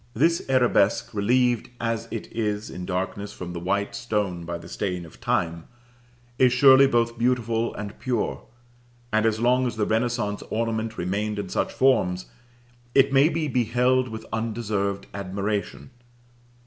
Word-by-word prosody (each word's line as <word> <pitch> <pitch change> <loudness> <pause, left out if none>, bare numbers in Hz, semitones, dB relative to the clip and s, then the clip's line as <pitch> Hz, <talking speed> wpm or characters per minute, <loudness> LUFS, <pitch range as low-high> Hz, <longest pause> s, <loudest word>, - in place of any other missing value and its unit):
This 165 +8 +3
arabesque, 120 -6 +2
relieved 120 +3 +2
as 115 -1 -2
it 115 - -5
is 105 -2 -2
in 90 0 -7
darkness 95 +2 -3
from 90 -1 -7
the 85 - -4
white 100 +3 -1
stone 105 -7 -2
by 85 0 -4
the - - -12
stain 90 -3 -3
of 80 - -16
time, 85 0 -1 0.7
is 125 -1 +5
surely 135 +1 +7
both 115 -2 +1
beautiful 115 -1 0
and 105 0 -7
pure; 125 -4 -1 0.7
and 110 +1 +3
as 110 -1 0
long 125 +2 +3
as 120 - -4
the 110 -1 0
renaissance 110 -2 -1
ornament 110 0 -2
remained 105 +4 -2
in 100 -2 -4
such - - -1
forms 95 -9 +2 0.7
it 135 0 +5
may 140 +3 +6
be 160 -1 -1
beheld 125 0 +2
with 110 0 -7
undeserved 110 -3 -2
admiration. 100 -5 -3
110 Hz, 150 wpm, -25 LUFS, 100-125 Hz, 0.7 s, surely